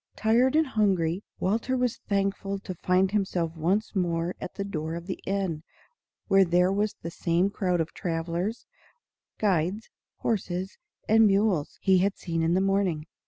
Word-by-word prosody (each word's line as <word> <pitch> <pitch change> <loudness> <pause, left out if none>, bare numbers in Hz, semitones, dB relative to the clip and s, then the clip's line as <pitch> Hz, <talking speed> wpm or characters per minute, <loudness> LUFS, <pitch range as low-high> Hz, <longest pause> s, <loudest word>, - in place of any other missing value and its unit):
Tired 240 +5 +3
and 315 0 +4
hungry, 195 - +1 0.2
Walter 230 +7 0
was 250 -2 0
thankful 200 0 0
to 190 - -6
find 185 +2 +1
himself 180 -5 -1
once 190 +8 0
more 170 -1 0
at - - -6
the 200 - -3
door 160 -4 -4
of 170 0 -6
the 185 - -5
inn, 190 -5 -1 0.7
where 195 0 +6
there 180 +1 +3
was 205 +1 0
the 170 - -4
same 175 +4 +1
crowd 180 -3 0
of 165 0 -2
travellers, 170 +5 -3 0.7
guides, 195 +1 0 0.2
horses, 190 -3 -2 0.3
and 220 0 +6
mules 195 -6 +1
he 190 -2 +5
had 195 +2 +1
seen 165 -2 -2
in 165 +2 +2
the 190 - +3
morning. 195 -5 +1
190 Hz, 160 wpm, -27 LUFS, 170-205 Hz, 0.7 s, where